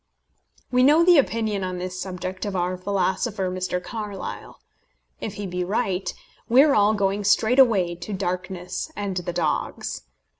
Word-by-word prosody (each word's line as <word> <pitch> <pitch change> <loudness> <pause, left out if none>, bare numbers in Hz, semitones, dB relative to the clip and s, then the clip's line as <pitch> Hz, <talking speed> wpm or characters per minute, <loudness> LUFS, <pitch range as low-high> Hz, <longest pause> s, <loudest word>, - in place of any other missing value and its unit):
We 250 0 +3
know 300 +6 +6
the 350 -4 +7
opinion 220 -6 0
on 185 -1 -3
this 185 +1 -5
subject 185 0 -5
of 205 -2 -3
our 180 0 0
philosopher 190 +1 -1
Mr. 185 0 -2
Carlyle. 210 -4 -6 0.6
If 210 - -5
he 205 - -5
be 180 -1 -2
right, 190 0 -1 0.4
we 255 +4 +7
are 295 -2 +4
all 210 -1 +4
going 200 0 0
straight 220 +5 +3
away 200 -9 +4
to 175 +5 -8
darkness 185 - -4
and 200 -5 -3
the 175 0 -2
dogs. 170 -3 -2
195 Hz, 155 wpm, -24 LUFS, 180-220 Hz, 0.6 s, the